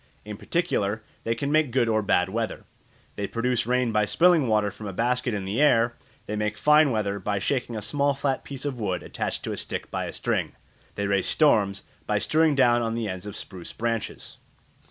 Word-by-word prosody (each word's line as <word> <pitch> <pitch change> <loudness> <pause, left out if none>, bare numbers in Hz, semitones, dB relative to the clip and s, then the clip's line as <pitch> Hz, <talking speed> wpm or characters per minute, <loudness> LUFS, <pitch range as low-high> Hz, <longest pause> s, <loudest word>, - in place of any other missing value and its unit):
In 105 0 -6
particular 110 - -1 0.2
they 115 - +1
can 140 +2 -2
make 155 -2 +3
good 120 -1 +2
or 110 -1 +2
bad 95 -3 +2
weather. 115 +2 -3 0.5
They 100 - -2
produce 115 +1 -1
rain 125 -1 +1
by 105 -1 +2
spilling 165 - +4
water 105 -2 +2
from 105 +2 -9
a 100 - -5
basket 120 +2 0
in 100 -2 -4
the 105 +8 -1
air; 120 -5 +4 0.3
they 105 - -4
make 105 0 -2
fine 150 0 +5
weather 105 -4 -1
by 100 +2 -1
shaking 120 +2 -1
a 105 - -4
small 140 +4 +1
flat 135 -1 -1
piece 135 0 -7
of 135 -4 -3
wood 95 -5 -2
attached - - -4
to - - -3
a - - -4
stick - - -5
by - - -2
a - - -5
string; - - -2 0.4
they 100 - -2
raise 100 -1 +1
storms 100 -10 +3 0.2
by - - +1
strewing 155 -1 +2
down 120 -3 +4
on 115 -1 -1
the 115 -2 -2
ends 95 +1 -5
of 105 - -6
spruce 90 -3 -8
branches. 115 -1 -4
115 Hz, 210 wpm, -26 LUFS, 105-135 Hz, 0.5 s, fine